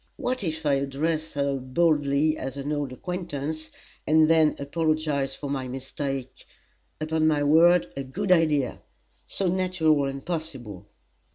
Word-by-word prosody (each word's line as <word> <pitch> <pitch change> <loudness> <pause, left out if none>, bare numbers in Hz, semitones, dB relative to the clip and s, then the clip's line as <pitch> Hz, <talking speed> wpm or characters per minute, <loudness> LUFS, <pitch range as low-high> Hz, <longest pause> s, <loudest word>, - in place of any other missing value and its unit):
What 255 -1 -2
if 160 -2 -3
I 145 - +3
address 155 +4 -2
her 140 -1 0
boldly 145 +2 +2
as 135 -2 -5
an 140 +2 -3
old 145 -3 -2
acquaintance, 155 -1 -4 0.4
and 155 0 +5
then 160 -1 +4
apologize 150 -2 -1
for 145 - -6
my 135 -2 -3
mistake? 135 0 -5 0.6
Upon 155 0 +1
my 150 -2 +2
word, 165 +4 +5
a 140 - -3
good 185 +9 -3
idea! 155 -7 +2 0.5
So 195 - -1
natural 175 -5 +2
and 135 0 -6
possible!" 140 - -5
150 Hz, 140 wpm, -26 LUFS, 140-160 Hz, 0.6 s, and